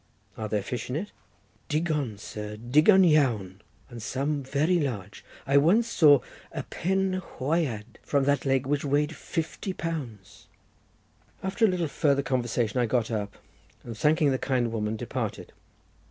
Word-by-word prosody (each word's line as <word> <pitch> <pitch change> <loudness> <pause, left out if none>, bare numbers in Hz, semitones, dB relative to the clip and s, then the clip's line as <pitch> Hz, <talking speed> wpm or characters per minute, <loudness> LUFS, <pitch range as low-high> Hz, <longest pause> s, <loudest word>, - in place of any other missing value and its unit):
"Are 110 -1 -5
there 105 -1 0
fish 120 +2 -5
in 125 - -2
it?" 195 +7 -4 0.6
"Digon, 150 -8 -1
sir, 105 0 -7
digon 150 - +5
iawn, 115 - +2 0.3
and 120 -2 -9
some 140 +5 -1
very 150 +7 +1
large. 105 - -4 0.2
I 140 +1 +3
once 190 +11 +4
saw 150 - +6 0.3
a - - -4
Pen 190 +1 -1
hwyad 130 -9 -2
from 140 -2 +1
that 140 0 +1
lake 135 -1 +1
which 140 +1 0
weighed 150 +2 +1
fifty 165 +6 -4
pounds." 140 - -6 1.0
After 200 +4 +2
a - - +5
little 180 -4 0
farther 140 -1 +1
conversation 120 -2 0
I 120 - +2
got 115 0 0
up, 105 -2 -3 0.5
and, 115 - -7
thanking 150 +3 +3
the 130 - 0
kind 125 -4 0
woman, 110 -1 -2
departed. - - -4
140 Hz, 150 wpm, -27 LUFS, 115-160 Hz, 1.0 s, saw